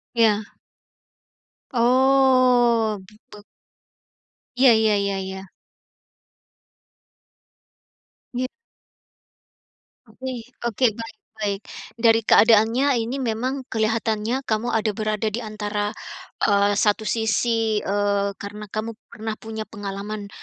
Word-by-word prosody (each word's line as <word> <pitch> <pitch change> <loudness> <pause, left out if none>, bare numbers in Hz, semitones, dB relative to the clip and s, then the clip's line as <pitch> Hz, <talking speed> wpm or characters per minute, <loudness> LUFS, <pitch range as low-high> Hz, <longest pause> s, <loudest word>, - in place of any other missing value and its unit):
Ya. 215 -2 +3 1.3
Oh, 250 -3 +4
be 210 - -18 0.2
beg 210 -1 -12 1.1
Iya 255 -1 +6 0.2
ya 210 - +3
ya 200 0 -1
ya. 190 0 -7 2.9
Ya. 255 +1 -1 1.6
Oke 260 +4 -8 0.3
oke, 235 +2 0
baik 225 -1 -9 0.2
baik. 205 -2 -2 0.4
Dari 230 -1 +4
keadaannya 225 +6 +4
ini 240 +5 -3
memang 255 +2 -2
kelihatannya 225 +3 -1
kamu 220 +2 -1
ada 220 -2 0
berada 215 +1 -2
di 235 - -2
antara, 210 -1 -3 0.6
eee, 200 0 +3
1 210 0 +2
sisi, 225 -1 +1
eee, 200 0 0
karena 210 +1 -8
kamu 220 +3 -4 0.2
pernah 220 -1 -5
punya 220 0 -7
pengalaman, 205 0 -6
220 Hz, 95 wpm, -23 LUFS, 210-235 Hz, 2.9 s, Iya